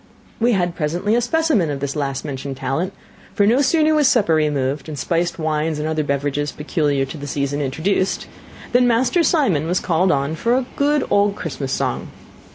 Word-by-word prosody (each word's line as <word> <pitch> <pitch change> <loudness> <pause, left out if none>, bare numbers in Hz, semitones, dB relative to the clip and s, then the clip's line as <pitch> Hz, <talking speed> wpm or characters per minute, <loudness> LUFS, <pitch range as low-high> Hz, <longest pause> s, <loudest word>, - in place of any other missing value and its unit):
We 235 +1 +3
had 175 -3 0
presently 175 +7 -1
a 240 - +3
specimen 275 - +1
of 140 -1 -3
his 140 -1 -3
last 140 -2 -3
mentioned 135 -1 -5
talent; 135 +8 -2 0.4
for 205 - +3
no 240 +6 +4
sooner 310 +2 +3
was 300 -3 +4
supper 210 -11 +3
removed, 145 -2 0
and 150 - -6
spiced 170 +3 -1
wines 155 -1 -1
and 150 +1 -2
other 155 -1 0
beverages 145 +1 -1
peculiar 150 -3 0
to 140 +3 -8
the 145 - -6
season 145 +1 -2
introduced, 185 +7 -1 0.5
than 245 0 +4
Master 245 +8 +2
Simon 265 - +2
was 180 +2 +1
called 180 +2 +1
on 140 +2 0
for 230 +9 +1
a 260 - -1
good 290 +1 +2
old 200 0 +3
Christmas 140 -7 -5
song. - - -2
160 Hz, 185 wpm, -20 LUFS, 145-220 Hz, 0.5 s, no